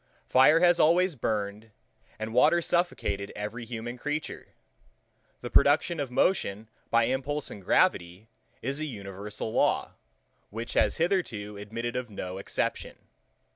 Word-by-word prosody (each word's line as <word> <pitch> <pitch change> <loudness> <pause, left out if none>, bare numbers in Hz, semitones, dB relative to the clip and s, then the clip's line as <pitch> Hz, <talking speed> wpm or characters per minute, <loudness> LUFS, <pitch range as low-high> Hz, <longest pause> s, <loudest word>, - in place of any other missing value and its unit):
Fire 150 +6 +6
has 175 -1 +5
always 175 +2 +4
burned, 105 -2 -3 0.5
and 110 +1 -5
water 150 +8 +5
suffocated 170 - -1
every 105 +3 -5
human 120 +1 -6
creature: 150 +3 -4 0.9
The - - -6
production 170 -2 +3
of 140 -3 -2
motion 110 - 0 0.2
by 115 0 +4
impulse 135 +4 -2
and 100 - -9
gravity 90 - +1 0.4
is 135 +4 -1
an 155 - -2
universal 105 -2 -6
law, - - +1 0.6
which 115 +3 -6
has - - +2
hitherto 145 - -1
admitted 115 +4 -5
of 125 -1 -3
no 95 -2 -6
exception. 100 - -3
115 Hz, 130 wpm, -28 LUFS, 105-150 Hz, 0.9 s, Fire